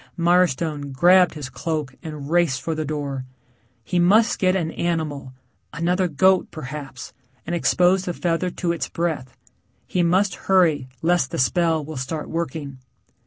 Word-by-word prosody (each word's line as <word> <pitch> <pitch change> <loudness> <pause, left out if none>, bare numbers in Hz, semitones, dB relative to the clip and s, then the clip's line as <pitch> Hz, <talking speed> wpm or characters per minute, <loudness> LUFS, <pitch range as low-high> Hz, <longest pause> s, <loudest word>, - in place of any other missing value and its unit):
Mirestone 170 -4 +1
grabbed 180 +6 +5
his 150 -3 -5
cloak 145 +2 -4
and 150 -3 -7
raced 165 -5 +2
for 165 - -2
the 155 0 -2
door. 140 -3 -4 0.6
He 180 +7 -1
must 210 +6 +4
get 185 0 +2
an 165 -4 -1
animal 155 -7 -3 0.4
another 180 +3 +1
goat, 185 +4 +3
perhaps, 140 -3 -8 0.3
and 170 - -4
expose 180 +2 +2
the 175 - -2
feather 175 +1 0
to 175 -1 -2
its 170 - -3
breath. 160 -7 -3 0.5
He 180 - -1
must 185 +3 +2 0.2
hurry 165 -8 +3 0.2
lest 170 -5 +2
the - - -4
spell 160 +2 +1
will 155 -1 -7
start 150 +4 -4
working. 150 -4 -4
165 Hz, 150 wpm, -22 LUFS, 145-175 Hz, 0.6 s, grabbed